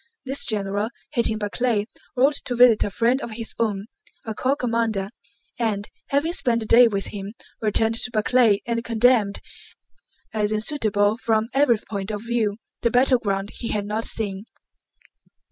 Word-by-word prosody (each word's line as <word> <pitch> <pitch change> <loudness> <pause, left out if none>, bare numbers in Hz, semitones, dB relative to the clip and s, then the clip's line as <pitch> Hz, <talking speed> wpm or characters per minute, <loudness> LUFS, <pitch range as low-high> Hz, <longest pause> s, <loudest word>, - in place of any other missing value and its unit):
This 270 +2 +2
general, 205 0 -1 0.2
hating 235 -5 +1
Barclay, 210 +1 0 0.3
rode 270 +4 +4
to 245 - -2
visit 240 -2 +6
a - - -2
friend 240 +6 +1
of 230 - -6
his 225 0 -3
own, 205 -3 -1 0.4
a 220 - -4
corps 260 +5 0
commander, 230 -6 -1 0.5
and, 210 -3 -1 0.2
having 290 +5 0
spent 235 -9 +1
the - - -4
day 240 +2 +7
with 200 -3 -2
him, 200 0 -6 0.3
returned 220 +1 +2
to - - -1
Barclay 215 -2 +2
and 235 -1 -2
condemned, 230 -3 +2 0.9
as 210 -1 0
unsuitable 215 -3 +1
from 225 -1 0
every 270 -4 +4
point 200 -2 -4
of 210 0 -4
view, 225 -3 0 0.2
the 235 - +2
battleground 225 -5 +1
he 235 - -6
had 210 -2 -2
not 215 +2 -3
seen. 200 -2 -3
225 Hz, 155 wpm, -23 LUFS, 205-240 Hz, 0.9 s, day